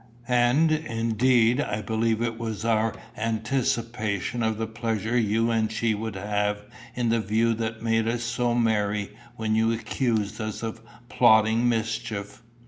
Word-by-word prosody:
And, 125 Hz, +6 st, +3 dB
indeed, 120 Hz, -3 st, +2 dB
I 105 Hz, -6 st, -3 dB
believe 110 Hz, +2 st, 0 dB
it 115 Hz, -1 st, -3 dB
was 110 Hz, -1 st, -4 dB
our 110 Hz, -1 st, +1 dB, 0.2 s
anticipation 115 Hz, -1 st, -1 dB
of 110 Hz, -1 st, 0 dB
the 110 Hz, -, -1 dB
pleasure 110 Hz, 0 st, -2 dB
you 115 Hz, 0 st, +2 dB
and 110 Hz, -1 st, +1 dB
she 115 Hz, 0 st, 0 dB
would 110 Hz, 0 st, -4 dB
have 105 Hz, +1 st, -1 dB, 0.3 s
in 120 Hz, -2 st, 0 dB
the 115 Hz, 0 st, +2 dB
view 110 Hz, +2 st, +1 dB
that 110 Hz, 0 st, -4 dB
made 115 Hz, -1 st, +1 dB
us 120 Hz, +1 st, -1 dB
so 120 Hz, 0 st, 0 dB
merry 105 Hz, -3 st, 0 dB, 0.2 s
when 110 Hz, -2 st, -1 dB
you 110 Hz, +1 st, +3 dB
accused 115 Hz, -2 st, -1 dB
us 110 Hz, +1 st, -4 dB
of 110 Hz, 0 st, -5 dB, 0.3 s
plotting 110 Hz, 0 st, +4 dB
mischief." 115 Hz, -2 st, -3 dB
115 Hz, 145 wpm, -26 LUFS, 110-115 Hz, 0.3 s, plotting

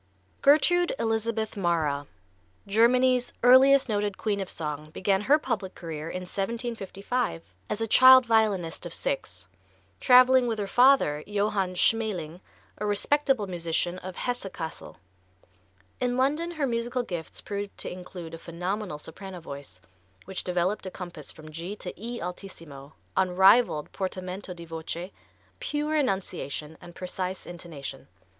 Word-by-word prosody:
Gertrude 350 Hz, +4 st, +4 dB
Elizabeth 225 Hz, -1 st, -1 dB
Mara, 160 Hz, -7 st, 0 dB, 0.6 s
Germany's 245 Hz, +4 st, +3 dB
earliest 260 Hz, +2 st, +7 dB
noted 205 Hz, -3 st, -1 dB
queen 205 Hz, -2 st, -1 dB
of 195 Hz, -, -4 dB
song, 150 Hz, -1 st, -5 dB
began 190 Hz, +4 st, 0 dB
her 280 Hz, +8 st, +5 dB
public 225 Hz, -10 st, -3 dB
career 160 Hz, -2 st, -6 dB
in 185 Hz, -, -4 dB
1755 200 Hz, -, -3 dB, 0.3 s
as 210 Hz, -, -2 dB
a -, -, +2 dB
child 255 Hz, +2 st, +8 dB
violinist 205 Hz, -7 st, +1 dB
of 170 Hz, -, -6 dB
six, 95 Hz, -8 st, -4 dB, 0.5 s
traveling 255 Hz, 0 st, +6 dB
with 225 Hz, -2 st, -1 dB
her 205 Hz, -, -2 dB
father, 245 Hz, -, +4 dB
Johann 200 Hz, -2 st, 0 dB
Schmäling, 180 Hz, -6 st, 0 dB, 0.4 s
a 210 Hz, -, -2 dB
respectable 265 Hz, +3 st, +1 dB
musician 175 Hz, 0 st, -2 dB
of 185 Hz, 0 st, -8 dB
Hesse 245 Hz, -5 st, -3 dB
Cassel. 160 Hz, -2 st, -7 dB, 1.0 s
In 245 Hz, 0 st, 0 dB
London 295 Hz, +6 st, +1 dB
her 310 Hz, -5 st, -1 dB
musical 240 Hz, 0 st, -1 dB
gifts 175 Hz, -7 st, -6 dB
proved 205 Hz, 0 st, -5 dB
to -, -, -4 dB
include 180 Hz, -2 st, -8 dB
a 165 Hz, -, -7 dB
phenomenal 180 Hz, +1 st, -4 dB
soprano 185 Hz, +4 st, -9 dB
voice, 140 Hz, -, -9 dB, 0.5 s
which 190 Hz, 0 st, -5 dB
developed 180 Hz, +3 st, -1 dB
a -, -, -2 dB
compass 175 Hz, -5 st, -8 dB
from 155 Hz, 0 st, -12 dB
G 170 Hz, +6 st, -5 dB
to 185 Hz, -, -7 dB
E 235 Hz, +3 st, -6 dB
altissimo, 165 Hz, -6 st, -8 dB, 0.2 s
unrivalled 190 Hz, -2 st, +4 dB
portamento 185 Hz, 0 st, -4 dB
di 170 Hz, -1 st, -9 dB
voce, 165 Hz, +3 st, -6 dB, 0.5 s
pure 305 Hz, -10 st, -1 dB
enunciation 190 Hz, -, -2 dB
and 175 Hz, 0 st, -12 dB
precise 185 Hz, 0 st, -4 dB
intonation. 160 Hz, -6 st, -8 dB
195 Hz, 135 wpm, -27 LUFS, 170-235 Hz, 1.0 s, child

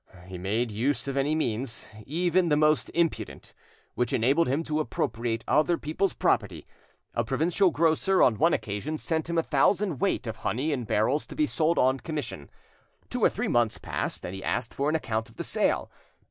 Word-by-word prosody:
He 90 Hz, -1 st, -8 dB
made 110 Hz, +6 st, -1 dB
use 120 Hz, +4 st, -1 dB
of 135 Hz, -, -2 dB
any 140 Hz, +3 st, +1 dB
means, 120 Hz, -4 st, -2 dB, 0.2 s
even 175 Hz, +3 st, +1 dB
the 150 Hz, -, +3 dB
most 155 Hz, 0 st, +3 dB
impudent, 170 Hz, -1 st, -1 dB, 0.4 s
which 125 Hz, -2 st, -1 dB
enabled 135 Hz, +8 st, +3 dB
him 140 Hz, +6 st, 0 dB
to 155 Hz, -1 st, -1 dB
appropriate 115 Hz, -4 st, -2 dB
other 155 Hz, +4 st, +3 dB
people's 160 Hz, +6 st, -1 dB
property. 95 Hz, -8 st, 0 dB, 0.5 s
A 120 Hz, -, 0 dB
provincial 165 Hz, -, +2 dB
grocer 165 Hz, +4 st, +3 dB
on 110 Hz, -4 st, +3 dB
one 165 Hz, +2 st, +4 dB
occasion 110 Hz, +9 st, -2 dB
sent 160 Hz, +1 st, -2 dB
him 170 Hz, -, -1 dB
a 165 Hz, -, +3 dB
thousand 170 Hz, +2 st, +2 dB
weight 195 Hz, -8 st, +1 dB
of 110 Hz, -1 st, -5 dB
honey 130 Hz, +10 st, -1 dB
in 125 Hz, -5 st, -2 dB
barrels 115 Hz, +8 st, +1 dB
to -, -, -9 dB
be 305 Hz, -, +2 dB
sold 165 Hz, -, +1 dB
on 130 Hz, +1 st, +3 dB
commission. 150 Hz, -, -5 dB, 0.6 s
Two -, -, -2 dB
or -, -, +7 dB
three -, -, -3 dB
months 120 Hz, -2 st, +2 dB
passed, -, -, -4 dB
and 90 Hz, -, -5 dB
he 95 Hz, -, -7 dB
asked 120 Hz, -2 st, -2 dB
for 140 Hz, +2 st, 0 dB
an 155 Hz, -, +1 dB
account 110 Hz, -6 st, -2 dB
of 115 Hz, -, -19 dB
the -, -, -4 dB
sale. -, -, 0 dB
140 Hz, 190 wpm, -27 LUFS, 115-160 Hz, 0.6 s, or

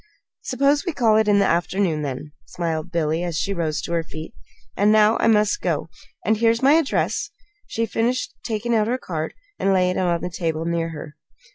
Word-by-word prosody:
"Suppose 280 Hz, +3 st, +1 dB
we 345 Hz, -, -3 dB
call 230 Hz, -6 st, +3 dB
it 220 Hz, -1 st, +2 dB
in 205 Hz, -1 st, +4 dB
the 200 Hz, -, +4 dB
afternoon, 175 Hz, -2 st, +1 dB
then," 145 Hz, +1 st, -5 dB, 0.2 s
smiled 165 Hz, 0 st, -3 dB
Billy, 160 Hz, -1 st, 0 dB
as 170 Hz, -3 st, -2 dB
she 200 Hz, -, -1 dB
rose 160 Hz, -4 st, -2 dB
to -, -, -5 dB
her 170 Hz, -, +2 dB
feet. 160 Hz, -1 st, -9 dB, 0.4 s
"And 205 Hz, +1 st, +3 dB
now 215 Hz, +1 st, +5 dB
I -, -, +2 dB
must 210 Hz, -2 st, +3 dB
go 165 Hz, -2 st, -1 dB, 0.4 s
and 220 Hz, +1 st, +2 dB
here's 230 Hz, +2 st, +2 dB
my 275 Hz, +2 st, +6 dB
address," 320 Hz, -3 st, +1 dB, 0.4 s
she 230 Hz, -, -1 dB
finished, 235 Hz, +3 st, -1 dB
taking 230 Hz, +1 st, -2 dB
out 215 Hz, -2 st, +2 dB
her 250 Hz, +2 st, 0 dB
card 160 Hz, -9 st, -5 dB, 0.2 s
and 195 Hz, -, +2 dB
laying 180 Hz, -1 st, +2 dB
it -, -, +1 dB
on 175 Hz, -2 st, +1 dB
the 180 Hz, -, -4 dB
table 165 Hz, -2 st, -2 dB
near 170 Hz, -1 st, -1 dB
her. 150 Hz, -2 st, -9 dB
190 Hz, 205 wpm, -22 LUFS, 165-225 Hz, 0.4 s, my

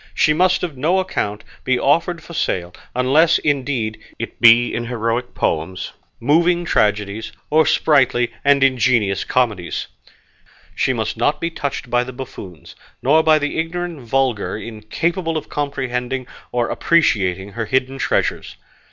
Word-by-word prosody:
She 155 Hz, -, +3 dB
must 180 Hz, +3 st, +2 dB
on 155 Hz, -7 st, -4 dB
no 165 Hz, +7 st, +2 dB
account 105 Hz, -, -2 dB, 0.2 s
be 130 Hz, -1 st, +1 dB
offered 165 Hz, +3 st, +1 dB
for 170 Hz, -, -11 dB
sale, 90 Hz, -, -2 dB, 0.2 s
unless, 150 Hz, +7 st, +4 dB
indeed, 130 Hz, -7 st, -1 dB, 0.2 s
it -, -, -7 dB
be 120 Hz, +1 st, +6 dB
in 120 Hz, -, -2 dB
heroic 115 Hz, +1 st, -2 dB
poems, 85 Hz, +4 st, -2 dB, 0.3 s
moving 170 Hz, +6 st, +2 dB
tragedies, 105 Hz, -3 st, 0 dB, 0.2 s
or 155 Hz, +1 st, +4 dB
sprightly 125 Hz, -5 st, +2 dB
and 140 Hz, -1 st, +4 dB
ingenious 120 Hz, -6 st, +2 dB
comedies. 105 Hz, -9 st, -1 dB, 0.9 s
She -, -, +1 dB
must 110 Hz, -3 st, -2 dB
not 120 Hz, +6 st, +1 dB
be 170 Hz, -, -2 dB
touched 140 Hz, -5 st, -4 dB
by 120 Hz, 0 st, +3 dB
the 130 Hz, +1 st, -8 dB
buffoons, 120 Hz, -, -10 dB, 0.3 s
nor 150 Hz, +5 st, +5 dB
by 160 Hz, -1 st, +4 dB
the 145 Hz, +1 st, -2 dB
ignorant 170 Hz, 0 st, -3 dB
vulgar, 120 Hz, -6 st, 0 dB
incapable 160 Hz, -, -3 dB
of 150 Hz, -, -6 dB
comprehending 130 Hz, -3 st, -3 dB, 0.3 s
or 120 Hz, -1 st, 0 dB
appreciating 100 Hz, -, +1 dB
her 110 Hz, +2 st, -3 dB
hidden 130 Hz, +2 st, 0 dB
treasures. -, -, -1 dB
130 Hz, 140 wpm, -19 LUFS, 115-155 Hz, 0.9 s, be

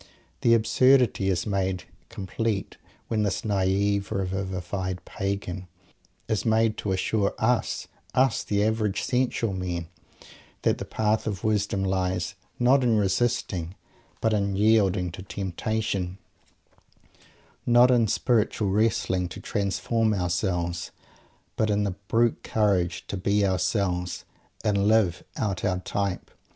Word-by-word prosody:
The 115 Hz, -1 st, +5 dB
absurdity 125 Hz, -2 st, +4 dB
is 90 Hz, -3 st, 0 dB
made 95 Hz, -3 st, -1 dB, 0.3 s
complete 100 Hz, +2 st, -3 dB, 0.3 s
when 110 Hz, -2 st, 0 dB
this 105 Hz, 0 st, -1 dB
naive, 100 Hz, 0 st, +1 dB
revivified 95 Hz, -1 st, -3 dB
"Pagan" 95 Hz, -2 st, -4 dB, 0.6 s
is 110 Hz, -, 0 dB
made 110 Hz, -1 st, +2 dB
to 100 Hz, -, -2 dB
assure 100 Hz, +2 st, 0 dB
us 120 Hz, +2 st, 0 dB, 0.3 s
us, 130 Hz, -2 st, +3 dB
"the 100 Hz, 0 st, +1 dB
average 110 Hz, -2 st, 0 dB
sensual 125 Hz, -4 st, 0 dB
men" 90 Hz, -3 st, -3 dB, 0.7 s
that -, -, +2 dB
the -, -, -4 dB
path 110 Hz, 0 st, 0 dB
of 100 Hz, -3 st, -3 dB
wisdom 105 Hz, -2 st, +1 dB
lies, 95 Hz, -2 st, -1 dB, 0.2 s
not 130 Hz, +2 st, +4 dB
in 115 Hz, -3 st, +3 dB
resisting, 100 Hz, -4 st, 0 dB, 0.5 s
but 110 Hz, -1 st, +2 dB
in 100 Hz, -2 st, 0 dB
yielding 100 Hz, -4 st, +3 dB
to 85 Hz, -, -8 dB
temptation; 95 Hz, 0 st, -3 dB, 1.5 s
not 120 Hz, +1 st, +6 dB
in 120 Hz, -3 st, +4 dB
spiritual 110 Hz, -2 st, +1 dB
wrestling 95 Hz, -4 st, +1 dB
to -, -, -8 dB
"transform" 110 Hz, +2 st, 0 dB
ourselves, 90 Hz, -2 st, -1 dB, 0.7 s
but 110 Hz, -, +1 dB
in 105 Hz, 0 st, +2 dB
the 100 Hz, -2 st, -1 dB
brute 115 Hz, 0 st, +2 dB
courage 95 Hz, -6 st, 0 dB
"to -, -, -5 dB
be 100 Hz, +2 st, +2 dB
ourselves," 95 Hz, -2 st, -1 dB, 0.4 s
and 100 Hz, -1 st, +2 dB
"live 110 Hz, -5 st, +3 dB
out 105 Hz, +1 st, -2 dB
our 95 Hz, -4 st, +1 dB
type"! 95 Hz, 0 st, -3 dB
100 Hz, 120 wpm, -26 LUFS, 95-110 Hz, 1.5 s, not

